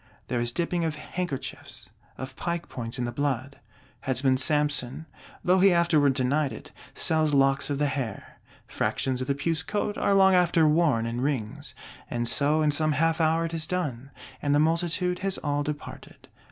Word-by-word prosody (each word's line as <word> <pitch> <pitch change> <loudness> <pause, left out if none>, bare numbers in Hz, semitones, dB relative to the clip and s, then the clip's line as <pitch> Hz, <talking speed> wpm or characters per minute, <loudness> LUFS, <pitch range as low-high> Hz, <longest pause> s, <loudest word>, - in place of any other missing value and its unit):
There 125 - 0
is 120 0 +1
dipping 170 +4 -1
of 160 -2 -1
handkerchiefs, 165 -2 -5 0.3
of 130 +1 -7
pike 170 +2 -3
points 120 0 -4
in 125 - -1
the 120 - -3
blood. 140 0 -2 0.4
Headsman 130 0 +1
Samson, 145 0 +1 0.4
though 185 +1 +4
he 195 +1 +6
afterward 160 -6 +3
denied 135 +2 +1
it, 110 - -10 0.2
sells 155 -2 +2
locks 135 +1 +3
of 140 - -1
the 145 - +1
hair: 130 -7 -4 0.3
fractions 130 -1 -1
of 130 - -3
the 140 - +1
puce 155 +2 0
coat 210 +1 -2
are 200 - +2
long 190 -1 +6
after 175 -3 +4
worn 150 -7 +2
in 115 +1 -3
rings. 130 -6 -3 0.3
And 120 0 -2
so, 150 +5 +2
in 150 - +3
some 155 +1 +1
half 165 +3 +1
hour 165 +1 +2
it 165 - -5
is 160 -1 -2
done; 140 -8 -3 0.3
and 145 0 +1
the - - +4
multitude 170 +3 +1
has 195 0 -1
all 145 -1 0
departed. 145 0 -7
150 Hz, 180 wpm, -26 LUFS, 130-165 Hz, 0.4 s, he